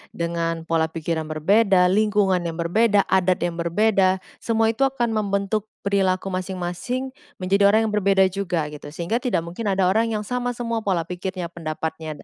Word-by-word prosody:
dengan 170 Hz, -1 st, -2 dB
pola 165 Hz, -1 st, +1 dB
pikir 160 Hz, 0 st, -3 dB
yang 155 Hz, -, -5 dB
berbeda, 180 Hz, +4 st, +3 dB
lingkungan 205 Hz, -2 st, +2 dB
yang 165 Hz, -1 st, -3 dB
berbeda, 200 Hz, +5 st, +2 dB
adat 185 Hz, -1 st, +2 dB
yang 175 Hz, -1 st, -2 dB
berbeda. 190 Hz, +1 st, +2 dB, 0.2 s
Semua 225 Hz, -1 st, +1 dB
itu 270 Hz, +4 st, +2 dB
akan 240 Hz, -4 st, -1 dB
membentuk 205 Hz, 0 st, -1 dB, 0.2 s
perilaku 195 Hz, -1 st, 0 dB
masing-masing 185 Hz, +8 st, -3 dB, 0.2 s
menjadi 195 Hz, +2 st, +2 dB
orang 215 Hz, +2 st, +4 dB
yang 220 Hz, -, -1 dB
berbeda 195 Hz, -2 st, +3 dB
juga 180 Hz, -4 st, -1 dB
gitu 150 Hz, 0 st, -9 dB
sehingga 170 Hz, +10 st, -2 dB
tidak 195 Hz, -10 st, -1 dB
mungkin 175 Hz, +6 st, -5 dB
ada 195 Hz, -1 st, +1 dB
orang 220 Hz, +5 st, +3 dB
yang 210 Hz, -, -2 dB
sama 245 Hz, +2 st, -2 dB
semua 230 Hz, -1 st, -2 dB
pola 190 Hz, -6 st, 0 dB
pikirnya, 180 Hz, 0 st, -5 dB
pendapatnya 160 Hz, -2 st, -5 dB
190 Hz, 165 wpm, -23 LUFS, 170-215 Hz, 0.2 s, orang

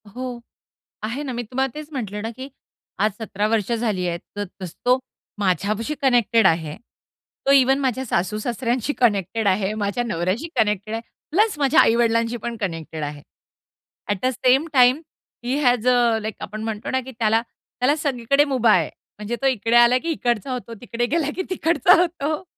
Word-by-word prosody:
हो. 250 Hz, -1 st, -5 dB, 0.6 s
आहे 240 Hz, +7 st, -3 dB
ना, 260 Hz, -3 st, -4 dB
मी 240 Hz, -, -3 dB
तुम्हाला 260 Hz, +3 st, -2 dB
तेच 305 Hz, 0 st, -7 dB
म्हटलं 210 Hz, -6 st, -4 dB
ना, 225 Hz, -, -3 dB
की 260 Hz, +4 st, -9 dB, 0.5 s
आज 215 Hz, -, +2 dB
17 210 Hz, -1 st, -1 dB
वर्ष 225 Hz, 0 st, 0 dB
झाली 215 Hz, -6 st, 0 dB
आहेत, 170 Hz, 0 st, -2 dB, 0.2 s
तर 205 Hz, 0 st, -2 dB, 0.2 s
तसं 180 Hz, -2 st, -6 dB
तो, 250 Hz, +1 st, +4 dB, 0.4 s
माझ्याविषयी 210 Hz, +8 st, 0 dB
कनेक्टेड 235 Hz, -5 st, +4 dB
आहे. 160 Hz, -2 st, 0 dB, 0.7 s
तो 275 Hz, -, +4 dB
इव्हन 270 Hz, 0 st, +5 dB
माझ्या 260 Hz, -1 st, -1 dB
सासू-सासऱ्यांशी 230 Hz, +7 st, -1 dB
कनेक्टेड 205 Hz, -1 st, +1 dB
आहे, 195 Hz, +2 st, +1 dB
माझ्या 210 Hz, +2 st, -1 dB
नवऱ्याशी 195 Hz, -, -2 dB
कनेक्टेड 210 Hz, 0 st, 0 dB
आहे 225 Hz, -, -2 dB, 0.3 s
प्लस 415 Hz, +2 st, +2 dB
माझ्या 280 Hz, +2 st, +4 dB
आई-वडिलांशी 230 Hz, 0 st, +2 dB
पण 235 Hz, -1 st, -4 dB
कनेक्टेड 165 Hz, -6 st, -4 dB
आहे. 145 Hz, 0 st, -5 dB, 0.9 s
At 205 Hz, -, +1 dB
the -, -, +4 dB
same 260 Hz, +5 st, +2 dB
time, 255 Hz, +3 st, +5 dB, 0.4 s
he 250 Hz, +2 st, -1 dB
has 245 Hz, -1 st, +2 dB
a 240 Hz, -2 st, +4 dB
like 215 Hz, -1 st, -4 dB
आपण 215 Hz, 0 st, -6 dB
म्हणतो 220 Hz, -1 st, -4 dB
ना, 260 Hz, -, +1 dB
की 260 Hz, +1 st, -10 dB
त्याला 225 Hz, 0 st, +3 dB
त्याला 250 Hz, +3 st, -2 dB
सगळीकडे 280 Hz, -1 st, +1 dB
मूभा 250 Hz, -6 st, +3 dB
आहे. 165 Hz, -4 st, +2 dB, 0.3 s
म्हणजे 210 Hz, +3 st, -3 dB
तो 275 Hz, -, +3 dB
इकडे 230 Hz, -2 st, +1 dB
आला 240 Hz, +1 st, +6 dB
की, 330 Hz, +6 st, -4 dB
इकडचा 240 Hz, -3 st, -1 dB
होतो, 245 Hz, -2 st, -5 dB
तिकडे 240 Hz, 0 st, -2 dB
गेला 310 Hz, +3 st, 0 dB
की 375 Hz, -, -1 dB
तिकडचा 340 Hz, -1 st, +3 dB
होतो. 320 Hz, -2 st, -2 dB
235 Hz, 175 wpm, -22 LUFS, 210-260 Hz, 0.9 s, आला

